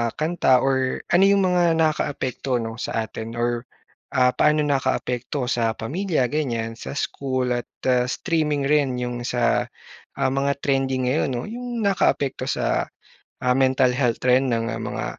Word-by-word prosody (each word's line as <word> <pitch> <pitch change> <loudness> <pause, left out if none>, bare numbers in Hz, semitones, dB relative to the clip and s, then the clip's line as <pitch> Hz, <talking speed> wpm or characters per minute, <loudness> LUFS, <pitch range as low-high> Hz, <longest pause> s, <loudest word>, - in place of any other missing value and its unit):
kanta 155 -5 +2
or 130 -1 0
ano 180 +3 +5
'yong 200 -1 +4
mga 180 -1 +3
nakakaapekto 140 -5 -1
'no, 115 +1 -6
sa 115 - -2
atin 110 +1 -7
or 120 +1 -1 0.5
ah, 125 -1 +4
paano 150 +4 +3
nakaapekto 130 -2 -1
sa 115 -2 0
pamilya 150 - -1
ganyan, 115 -6 -2
sa - - -6
school 130 -3 -2
at 120 0 -2 0.4
streaming 150 -1 0
rin 140 -2 +2
'yong 120 -1 -4
sa, 120 -2 +1 0.5
ah, - - +2
mga 140 +1 0
trending 135 -2 0
ngayon, 135 +1 +1
'no, 120 -1 -2
yung 240 -1 -4
nakaapekto 145 -7 +1
sa, - - 0 0.6
ah, 125 0 +1
mental 130 -1 +3
health 125 -3 +1
trend 130 +1 +3
ng 115 -1 -1
mga, - - -4
130 Hz, 145 wpm, -23 LUFS, 120-150 Hz, 0.6 s, ano